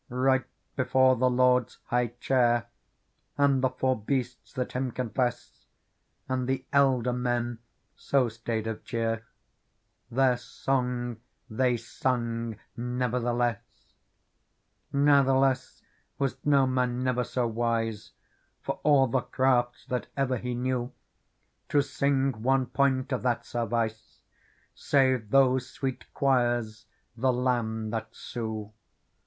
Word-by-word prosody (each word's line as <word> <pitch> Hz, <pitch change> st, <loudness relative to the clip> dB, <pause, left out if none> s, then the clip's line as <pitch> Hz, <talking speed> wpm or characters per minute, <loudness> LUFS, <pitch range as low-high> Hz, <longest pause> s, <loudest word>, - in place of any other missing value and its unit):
Right 130 Hz, +1 st, +2 dB, 0.3 s
before 130 Hz, 0 st, +4 dB
the 125 Hz, +1 st, +2 dB
Lord's 125 Hz, -1 st, +2 dB
high 120 Hz, 0 st, +1 dB
chair. 120 Hz, -3 st, +2 dB, 0.7 s
And 140 Hz, -2 st, +3 dB
the 130 Hz, -, +4 dB
four 130 Hz, +1 st, 0 dB
Beasts 125 Hz, +1 st, -3 dB
that 130 Hz, -3 st, -3 dB
Him 130 Hz, 0 st, -1 dB
confess 120 Hz, 0 st, -3 dB, 0.6 s
And 130 Hz, -1 st, -1 dB
the 130 Hz, 0 st, -1 dB
Elder 130 Hz, -3 st, +3 dB
men 120 Hz, -1 st, -1 dB, 0.4 s
so 135 Hz, -3 st, +1 dB
staid 115 Hz, -1 st, -3 dB
of 110 Hz, -1 st, -4 dB
cheerj 115 Hz, -2 st, -1 dB, 0.9 s
Their 125 Hz, 0 st, +3 dB
song 125 Hz, -2 st, -2 dB, 0.3 s
they 125 Hz, +2 st, +2 dB
sungen 115 Hz, -1 st, -2 dB, 0.2 s
never 125 Hz, 0 st, -1 dB
the 120 Hz, 0 st, 0 dB
less 120 Hz, -2 st, -3 dB, 0.5 s
'' -, -, -47 dB
Natheless 135 Hz, -2 st, +3 dB, 0.3 s
was 135 Hz, -3 st, 0 dB
no 140 Hz, -2 st, +4 dB
man 125 Hz, -1 st, 0 dB
never 125 Hz, -1 st, +1 dB
so 125 Hz, 0 st, -1 dB
wise, 115 Hz, -2 st, -2 dB, 0.5 s
For -, -, -3 dB
all 145 Hz, -3 st, +5 dB
the 130 Hz, +1 st, 0 dB
crafts 125 Hz, -1 st, +1 dB
that 125 Hz, -1 st, -3 dB
ever 130 Hz, -2 st, +1 dB
he 125 Hz, +1 st, -3 dB
knew, 125 Hz, 0 st, -1 dB, 0.8 s
To 145 Hz, -1 st, +3 dB
sing 135 Hz, -3 st, 0 dB
one 130 Hz, +2 st, +2 dB
point 130 Hz, +1 st, +1 dB
of 130 Hz, -, 0 dB
that 120 Hz, -2 st, 0 dB
service. 115 Hz, -1 st, -3 dB, 0.5 s
Save 130 Hz, -6 st, +2 dB
those 130 Hz, 0 st, +3 dB
sweet 135 Hz, -2 st, -5 dB
choirs 120 Hz, -5 st, +1 dB, 0.3 s
the 130 Hz, +2 st, +2 dB
Lamb 120 Hz, -3 st, -1 dB
that 110 Hz, 0 st, -4 dB
sue. 110 Hz, -3 st, -5 dB
125 Hz, 120 wpm, -28 LUFS, 120-130 Hz, 0.9 s, all